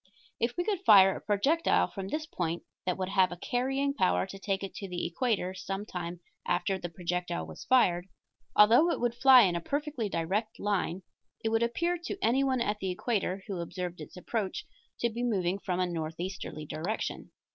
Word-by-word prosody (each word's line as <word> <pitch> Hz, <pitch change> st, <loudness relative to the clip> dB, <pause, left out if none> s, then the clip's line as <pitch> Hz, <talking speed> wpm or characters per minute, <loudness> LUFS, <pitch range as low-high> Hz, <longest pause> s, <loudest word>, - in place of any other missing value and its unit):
If 235 Hz, +1 st, -1 dB
we 350 Hz, -, +1 dB
could 390 Hz, -1 st, -2 dB
fire 195 Hz, -, +7 dB
a -, -, -7 dB
projectile 275 Hz, +12 st, +2 dB
from 195 Hz, -2 st, -6 dB
this 305 Hz, +9 st, -3 dB
point 170 Hz, -, -3 dB, 0.2 s
that 180 Hz, -, 0 dB
would 185 Hz, -1 st, -2 dB
have 190 Hz, -2 st, +3 dB
a 175 Hz, -, -6 dB
carrying 270 Hz, +7 st, 0 dB
power 190 Hz, -9 st, +2 dB
to 195 Hz, 0 st, -9 dB
take 195 Hz, 0 st, -2 dB
it 195 Hz, -, -5 dB
to 195 Hz, -, -5 dB
the 180 Hz, -1 st, -3 dB
equator 190 Hz, -1 st, -1 dB
some 195 Hz, +2 st, -5 dB
time 175 Hz, -2 st, -6 dB, 0.2 s
after 180 Hz, +2 st, 0 dB
the 175 Hz, -, -5 dB
projectile 175 Hz, -, -3 dB
was 80 Hz, -1 st, -10 dB
fired, 185 Hz, -9 st, +3 dB, 0.5 s
although 235 Hz, +11 st, +7 dB
it -, -, 0 dB
would 240 Hz, -1 st, +1 dB
fly 255 Hz, +1 st, +8 dB
in 180 Hz, -3 st, +2 dB
a 170 Hz, -, -2 dB
perfectly 285 Hz, -, -2 dB
direct 195 Hz, +6 st, -2 dB
line, 195 Hz, -3 st, -1 dB, 0.4 s
it 225 Hz, -, +1 dB
would 225 Hz, 0 st, +2 dB
appear 340 Hz, +10 st, 0 dB
to 345 Hz, -, -5 dB
anyone 265 Hz, -4 st, +2 dB
at 210 Hz, -2 st, 0 dB
the 190 Hz, -, -2 dB
equator 190 Hz, -1 st, -1 dB
who 195 Hz, -3 st, -4 dB
observed 180 Hz, +1 st, -5 dB
its -, -, -10 dB
approach 200 Hz, +1 st, -3 dB, 0.4 s
to 235 Hz, -, +2 dB
be 235 Hz, +2 st, -4 dB
moving 195 Hz, -6 st, 0 dB
from 180 Hz, -2 st, -2 dB
a 185 Hz, -, +2 dB
northeasterly 165 Hz, -1 st, -5 dB
direction. 160 Hz, +9 st, -4 dB
195 Hz, 190 wpm, -30 LUFS, 180-240 Hz, 0.5 s, fly